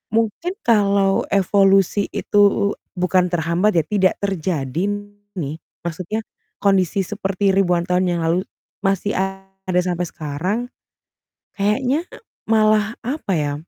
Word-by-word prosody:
Mungkin 230 - -1
kalau 200 -3 +3
evolusi 195 0 +3
itu 205 - -2
u 200 - 0 0.3
bukan 180 0 +2
terhambat 175 +4 +1
ya, 160 - +3
tidak 190 +1 +2
terjadi 170 -6 -2 0.5
nih, 150 -3 -3 0.3
maksudnya 175 +5 -3 0.4
kondisi 195 -1 +2
seperti 195 0 0
ribuan 175 -3 +2
tahun 180 +1 +1
yang 175 -1 0
lalu 170 +3 +2 0.4
masih 195 +1 0
ada 195 -1 -2
sampai 180 -1 -1
sekarang, 160 +8 -3 1.0
kayaknya 250 +9 +1 0.5
malah 215 0 +3
apa 260 -5 -3
ya, 145 -2 -1
195 Hz, 115 wpm, -20 LUFS, 175-205 Hz, 1.0 s, kalau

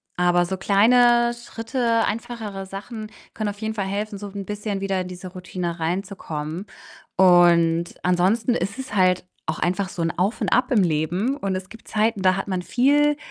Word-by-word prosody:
aber 175 0 +3
so 190 +2 -3
kleine 240 +5 +4
Schritte, 235 0 -1
einfachere 215 -3 -4
Sachen 215 +3 -8 0.2
können 215 -2 -2
auf 205 0 -7
jeden 220 0 -3
Fall 200 -3 -2
helfen, 205 +2 -3
so 205 - -7
'n 200 -1 -6
bisschen 205 0 -3
wieder 195 -1 0
in 180 - -5
diese 180 0 -8
Routine 180 -2 -5
reinzukommen 170 -1 -4 0.5
und 170 -2 +5 0.2
ansonsten 190 +7 +2
ist 200 +7 -3
es 260 -5 -6
halt 185 -1 +3 0.2
auch 155 - -3
einfach 185 +2 0
so 185 -3 -5
'n 165 - +1
Auf 195 +6 0
und - - +1
Ab 250 +2 +2
im 215 -6 +4
Leben 175 - 0
und 195 -7 -2
es 185 0 -6
gibt 225 - -14
Zeiten, 215 -1 +1
da 185 -1 +4
hat 195 - -4
man 185 -2 -1
viel 290 +8 +3
195 Hz, 185 wpm, -23 LUFS, 180-225 Hz, 0.5 s, und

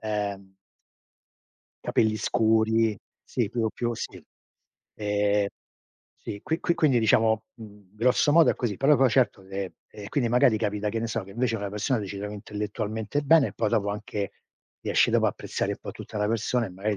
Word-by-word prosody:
ehm 100 -3 -3 1.3
capelli 110 -1 +2
scuri 110 0 +2 0.3
sì 115 -5 -1
più 115 0 -1
più 120 -1 -2
sì. - - -7 0.7
Ehm, 105 -1 +1 0.7
sì. 100 - -7
Qui 160 +1 -2
qui 170 - +1
quindi 150 -7 +3
diciamo, 110 -1 +3
mhmm, 105 -3 -14
grosso 125 +5 +3
modo 165 0 +6
è - - 0
così. 110 -6 -2
Però 145 +2 +4
poi 135 -1 +4
certo, 115 -5 +2
ehm, 95 0 -5 0.2
e 100 -1 -9
quindi 125 -6 +1
magari 120 -2 +4
capita 105 -1 -1
che 115 - -2
ne 115 - -1
so 115 0 -2
che 95 - -13
invece 115 +2 0
una 100 -1 -4
persona, 105 +4 0
ti 100 - -5
ci 100 +1 -6
trovi 105 +1 -5
intellettualmente 105 +5 -3
bene 145 0 +5
e - - -10
poi 110 - 0
dopo 105 -3 +1
anche, 105 -1 -4 0.5
riesci - - +2
dopo - - +3
apprezzare - - -2
un - - -7
po' - - -6
tutta 105 - -7
la 105 - +1
persona 115 +2 0
e 95 - -9
magari 100 +3 -2
110 Hz, 185 wpm, -26 LUFS, 105-120 Hz, 1.3 s, modo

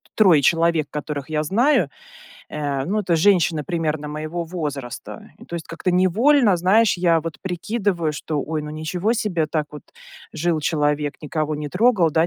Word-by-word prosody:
3 180 -9 +5
человек, 165 0 +2
которых 150 -2 -5
я 155 -1 0
знаю, 225 - +2 0.6
э, 145 -3 -3
ну, 205 +7 0
это 180 -4 +1
женщины 165 -3 +3
примерно 155 -3 -2
моего 155 +3 -4
возраста. 145 -7 -6
И - - -13
то - - -9
есть 165 -2 -5
как-то 165 +2 -2
невольно, 205 +5 +4
знаешь, 195 +6 +3
я 170 -2 +3
вот 165 0 -6
прикидываю, 185 -2 -1
что: 150 +1 -3
"Ой, 155 +2 -3
ну 150 - -7
ничего 170 +7 -1
себе, 200 -9 -1
так 150 -1 -2
вот 150 - -9 0.5
жил 160 0 0
человек, 150 -1 0
никого 155 0 -2
не 150 0 -5
трогал, 190 - +3
да, 160 +2 +3
165 Hz, 165 wpm, -22 LUFS, 150-185 Hz, 0.6 s, 3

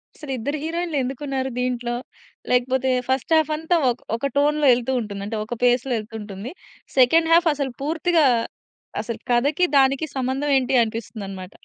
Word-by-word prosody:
అసలు 295 -3 -8
ఇద్దరు 285 +7 -3
హీరోయిన్‌లు 335 -1 -2
ఎందుకు 265 +2 -5
ఉన్నారు 265 -1 -2
దీంట్లో? 245 -1 -1 0.6
లేకపోతే 260 +1 +2 0.2
ఫస్ట్ 265 +4 0
హాఫ్ 310 -1 +2
అంతా 325 +3 0
ఒక 240 - -2 0.2
ఒక 275 +4 -1
టోన్‌లో 295 0 +3
ఎళ్తూ 245 +2 -1
ఉంటుంది. 200 -2 -6
అంటే 220 +1 -4
ఒక 240 - -5
పేస్‌లొ 245 +1 +2
ఎళ్తూ 220 +1 -10
ఉంటుంది. 205 +5 -7 0.5
సెకండ్ 325 +6 +5
హాఫ్ 340 0 +5
అసలు 275 -3 -3
పూర్తిగా 320 +1 +2 0.8
అసలు 225 0 -5
కథకి, 285 +8 +2
దానికి 270 +3 +3
సంబంధం 265 +3 -1
ఏంటి 265 0 -1
అనిపిస్తుందన్నమాట. 205 -4 -6
260 Hz, 155 wpm, -22 LUFS, 240-295 Hz, 0.8 s, సెకండ్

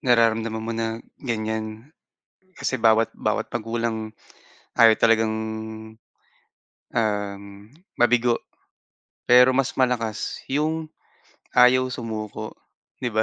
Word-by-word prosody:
nararamdaman 115 -3 +2
mo 115 - -3
na 115 0 -2 0.2
ganyan, 110 +2 -4 0.7
kasi - - -2
bawat, 115 0 +4
bawat - - -1
magulang 115 -1 -3 0.6
ayaw 115 -1 +7
talagang, 110 -1 +3 1.6
um, 105 -3 -1 0.5
mabigo. 120 0 +3 0.9
Pero 125 +1 +7
mas 130 0 0
malakas 120 -4 -1
yung 155 +3 -1 0.7
ayaw 125 +1 +6
sumuko, 110 -2 -5 0.5
'di 120 -3 -3
ba? 110 - +3
115 Hz, 90 wpm, -24 LUFS, 110-125 Hz, 1.6 s, ayaw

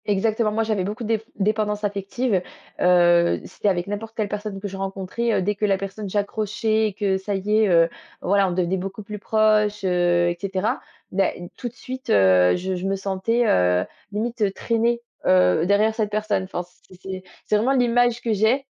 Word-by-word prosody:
Exactement. 215 +2 +1
Moi 225 +1 0
j'avais 215 -4 -1
beaucoup 210 +5 -4
déf 220 -1 0
dépendances 210 0 0
affective. 200 +1 -1 0.4
Heu, 175 -1 +4
c'était - - -4
avec 175 -3 +1
n'importe 210 +3 -6
quelle 215 -2 -1
personne 205 -1 -4
que 205 - -5
je 195 - -7
rencontrais, 195 +4 -2
heu, - - +2
dès 205 +3 +1
que 210 +1 -1
la 195 -2 +2
personne 195 +1 -6
j'accrochais 215 +2 0
et 210 - -5
que 195 -1 0
ça 195 +1 -3
y 210 +3 0
est, 220 - +4
heu, 165 -2 +5 0.3
voilà, 200 +1 +2
on - - -3
devenait 180 +1 0
beaucoup 195 +3 -6
plus 210 0 -7
proche, 210 -1 +2
heu 175 -1 +2
et 175 - -3
cetera. 195 +5 -1 0.3
Bah 195 0 +2 0.3
tout 245 - -5
de - - -23
suite, 260 0 -8
heu, 95 -2 +5
je 185 +1 -3
je 180 +1 -4
me 195 - 0
sentais, 195 +5 0
heu, 90 0 +3 0.3
limite 215 -1 -1
traînée, 235 +1 0 0.3
heu, 90 - +4
derrière 210 +2 +3
cette 220 -2 -1
personne. 210 -2 -1
Enfin, 180 -1 -4 0.3
c'est 185 - -14
c'est 190 -1 -7 0.2
c'est - - +1
vraiment 245 +6 +2
l'image 245 -2 +2
que 230 - 0
j'ai 220 +7 +2
205 Hz, 195 wpm, -23 LUFS, 190-220 Hz, 0.4 s, heu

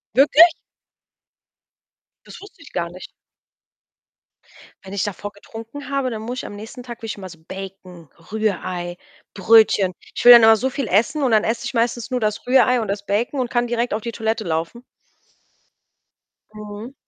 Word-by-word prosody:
Wirklich? 295 +5 +7 1.8
Das - - -12
wusste 400 -3 -15
ich - - -16
gar 170 -1 -2
nicht. 185 +2 -10 1.8
Wenn 190 +1 -10
ich 200 - -1
davor 205 0 -5
getrunken 230 +7 -10
habe, 275 -2 -1
dann 220 -1 -5
muss 245 +3 -5
ich - - -6
am 205 - -8
nächsten 225 +4 -10
Tag 240 -1 -9
will 225 - -6
ich 210 - -5
immer 190 -2 -8
so 165 -2 -14
Bacon, 190 -4 -10 0.2
Rührei, 185 -5 -3 0.4
Brötchen. 200 -2 +4 0.2
Ich - - -3
will 245 - +11
dann 235 -2 +10
immer 225 0 +8
so 260 +5 -1
viel 265 -3 -4
essen 235 - +1
und 250 - +1
dann 215 -1 +4
esse 230 +1 -2
ich 265 - -4
meistens 235 +1 -1
nur 250 - 0
das 215 -1 -2
Rührei 250 -1 +4
und 215 - -4
das 200 +1 -4
Bacon, 230 +7 -1
und 245 -2 -1
kann 240 0 0
direkt 240 0 -1
auf 215 - -2
die 235 - -5
Toilette 220 0 -2
laufen. 165 +8 -3 1.7
Mhm. 210 +4 -9
220 Hz, 175 wpm, -21 LUFS, 200-245 Hz, 1.8 s, will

